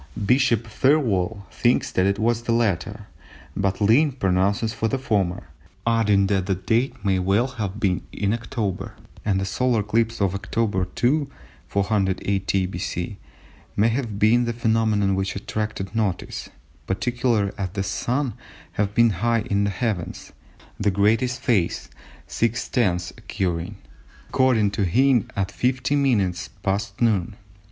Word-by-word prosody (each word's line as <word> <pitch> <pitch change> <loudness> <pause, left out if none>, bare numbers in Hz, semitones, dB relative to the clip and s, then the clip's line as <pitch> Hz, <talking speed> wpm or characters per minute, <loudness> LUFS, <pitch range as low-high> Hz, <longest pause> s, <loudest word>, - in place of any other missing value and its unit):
Bishop 125 -1 +3
Thirlwall 110 -5 +1
thinks 120 +1 +1
that 95 +1 +2
it 100 - +1
was 115 +2 +1
the 120 - -2
latter, 105 -2 0 0.5
but 100 -1 0
Lynn 125 +8 +4
pronounces 100 0 +1
for 110 +1 -1
the 135 - 0
former, 100 - -1 0.4
adding 110 -4 +3
that 95 -1 0
the 95 - +1
date 115 +7 -1
may 95 -1 +2
well 100 +6 +2
have 110 -6 -4
been 95 -4 +1
in 100 +1 -1
October, 115 -4 -3 0.3
and 100 -3 +1
the 95 - -1
solar 115 +4 +1
eclipse 115 +2 0
of 100 -3 +1
October 100 -1 -1
2, 140 +3 +1 0.4
480 100 -1 0
B.C. 90 +1 -4 0.6
may 110 +3 +3
have 115 -4 -2
been 115 +4 +4
the 120 - -1
phenomenon 110 -3 +1
which 95 +1 -1
attracted 105 0 -4
notice, 105 -5 -2 0.4
particularly 115 +1 0
as 95 -2 -1
the 100 -1 -1
Sun 125 +8 -1
would - - -8 0.4
have 105 0 -1
been 115 -1 +5
high 115 +4 +1
in 100 0 +2
the - - +1
heavens, 100 -3 -3 0.5
the 105 - +2
greatest 110 +6 +2
phase 100 -10 0 0.4
(6/10ths) 110 -6 0
occurring, 90 +1 -3 0.5
according 120 -6 +3
to 100 0 -1
Hind, 125 +5 +3
at 100 0 -1
50 130 +5 0
minutes 100 -11 +1
past 100 0 -2
noon. 105 -3 +1
105 Hz, 140 wpm, -23 LUFS, 95-115 Hz, 0.6 s, been